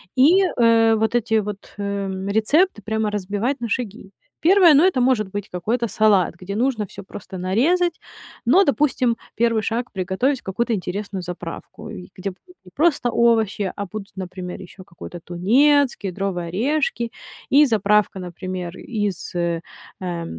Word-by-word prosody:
И, 330 +9 +6
э, 230 -7 +4
вот 220 +1 0
эти 235 -1 +1
вот, 210 -2 -3
э, 200 -1 -2 0.2
рецепты 220 - +2
прямо 220 +1 -1
разбивать 210 +7 -2
на 235 - -3
шаги. 210 -4 -4 0.3
Первое, 355 -2 +7
ну, 285 - +6
это 360 -9 +3
может 245 -6 +2
быть 205 +1 -5
какой-то 225 +7 -1
салат, 205 -3 +3
где 185 +3 -7
нужно 235 -4 0
всё 200 - -10
просто 190 0 -9
нарезать. 315 - +1 0.4
Но, 335 +12 +5
допустим, 275 -6 +1 0.2
1 230 -1 +2
шаг- 235 +3 -2
приготовить 195 +9 0
какую-то 230 +5 -2
интересную 195 0 -4
заправку, 180 0 -8
э, 90 -1 -9
где 190 +1 -4 0.3
не 180 - -15
просто 290 -6 +2
овощи, 220 -4 +2
а 200 - -4
будут, 200 +1 -8
например, 185 -1 -6
еще 185 0 -12
какой-то 175 -1 -10
тунец, 255 +10 +3
кедровые 190 -2 -3
орешки 235 - -1 0.4
и 285 +2 +6
заправка, 210 -3 +2
например, 180 0 -6
из, 205 -6 -3
э, 170 -1 -1 0.4
э, 175 -2 -3
210 Hz, 145 wpm, -22 LUFS, 190-245 Hz, 0.4 s, Первое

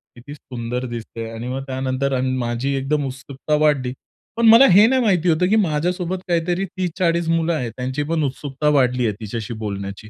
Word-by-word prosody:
किती 125 +4 -11
सुंदर 125 -3 -5
दिसतेय 115 -1 -6
आणि 115 +2 -6
मग 135 +1 -4
त्यानंतर 130 +1 -2
अन् 130 0 -1
माझी 120 +3 -2
एकदम 140 +2 -1
उत्सुकता 135 +3 -4
वाढली. 140 -5 +1 0.4
पण 235 - +2
मला 230 +4 +9
हे 205 +4 +7
नाही 260 +1 +2
माहिती 180 -6 +2
होतं 165 +2 +2
की 220 - +3
माझ्यासोबत 180 -1 0
काहीतरी 175 +2 0
30-40 175 -2 -1
मुलं 165 0 +1
आहेत 125 -7 -3
त्यांची 130 +3 -2
पण 165 -2 0
उत्सुकता 140 +1 -2
वाढली 125 -4 +2
आहे 105 - -1
तिच्याशी 110 +2 -5
बोलण्याची. 100 0 -6
140 Hz, 180 wpm, -21 LUFS, 125-170 Hz, 0.4 s, मला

